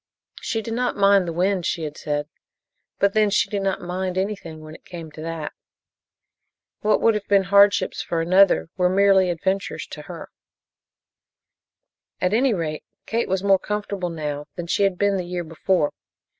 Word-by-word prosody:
She 225 -2 -2
did 225 - -4
not 245 0 -1
mind 200 -2 +4
the - - -2
wind, 185 +2 0
she 170 0 -2
had 150 -1 -5
said, 145 0 -3 0.7
but 200 0 +2
then 215 -1 +3
she 200 - +1
did 200 -2 -1
not 195 -1 -1
"mind" 185 +1 -3
anything, 190 -5 -3
when 155 0 -10
it - - -14
came 165 -3 -9
to 155 - -10
that. 165 -2 -5 1.3
What 215 -1 +2
would 230 - +4
have 210 -1 -4
been 200 -1 +4
hardships 200 +1 +4
for 170 - -2
another 185 0 +4
were 180 -1 +3
merely 190 -1 +4
adventures 190 +3 -2
to - - -7
her. - - -8 1.9
At 180 +2 0
any 255 +4 +3
rate, 155 -3 -3 0.2
Kate 230 -1 -1
was 190 0 0
more 195 -1 +4
comfortable 200 -3 -3
now 150 -3 -4
than 175 - -5
she 170 - 0
had 195 -2 0
been 200 0 +2
the 185 - -2
year 175 0 -4
before. 165 -1 0
185 Hz, 175 wpm, -23 LUFS, 165-200 Hz, 1.9 s, mind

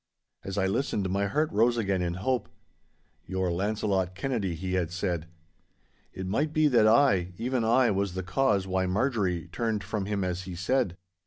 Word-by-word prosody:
As 95 +1 -5
I 95 - +2
listened 100 -1 0
my 100 +1 +1
heart 150 +10 0
rose 115 +3 +3
again 100 -4 0
in 85 -1 -1
hope. 125 +7 -1 0.8
'Your 95 -1 -1
Launcelot 95 -1 -1
Kennedy,' 100 -5 -2
he 90 +3 -4
had 90 -3 0
said. 90 -2 -2 0.8
It 95 - -6
might 145 +11 0
be 155 -1 +4
that 115 -5 +5
I, 110 -7 +4
even 125 +1 -1
I, 120 +1 +4
was 100 -2 -1
the 95 - -3
cause 100 -1 +1
why 95 0 0
Marjorie 95 - 0
turned 110 -2 -1
from 100 +1 -3
him 100 -2 -1
as 90 0 -3
he 90 -2 -6
said. 90 +1 0
100 Hz, 175 wpm, -28 LUFS, 95-115 Hz, 0.8 s, that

